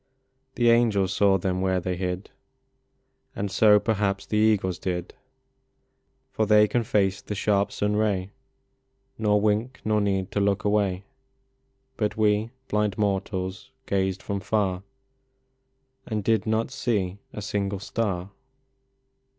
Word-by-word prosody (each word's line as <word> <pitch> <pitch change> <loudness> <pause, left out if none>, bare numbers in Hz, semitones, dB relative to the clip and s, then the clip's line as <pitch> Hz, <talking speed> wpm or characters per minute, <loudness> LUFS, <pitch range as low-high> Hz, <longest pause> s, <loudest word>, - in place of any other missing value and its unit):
The 120 -1 +4
angels 105 -5 +3
saw 100 0 +4
them 95 0 -1
where 95 -1 +1
they 90 0 -2
hid, 90 +1 -4 1.0
And 100 -1 -3
so, 105 +1 +6
perhaps, 100 -3 -1
the 105 - -1
eagles 100 -5 +2
did, 90 -1 -3 1.2
For 110 - 0
they 105 0 +6
can 120 - +1
face 100 -2 +1
the 105 - -5
sharp 100 0 +1
sun 105 0 -1
ray, 100 -3 0 0.9
Nor 105 -1 +3
wink, 110 +5 0
nor 105 -1 +2
need 95 -1 -1
to - - -1
look 100 +2 +1
away; 100 -2 +1 0.9
But 105 -1 -1
we, 105 +1 +2 0.2
blind 105 -2 0
mortals, 95 0 -2 0.2
gazed 95 -1 -1
from 100 -1 -3
far, 95 -2 0 1.3
And 105 -2 -2
did 110 0 +1
not 110 +3 0
see 100 -8 -1
a 105 - -7
single 100 0 -2
star. 100 -3 -3
100 Hz, 130 wpm, -25 LUFS, 95-105 Hz, 1.3 s, so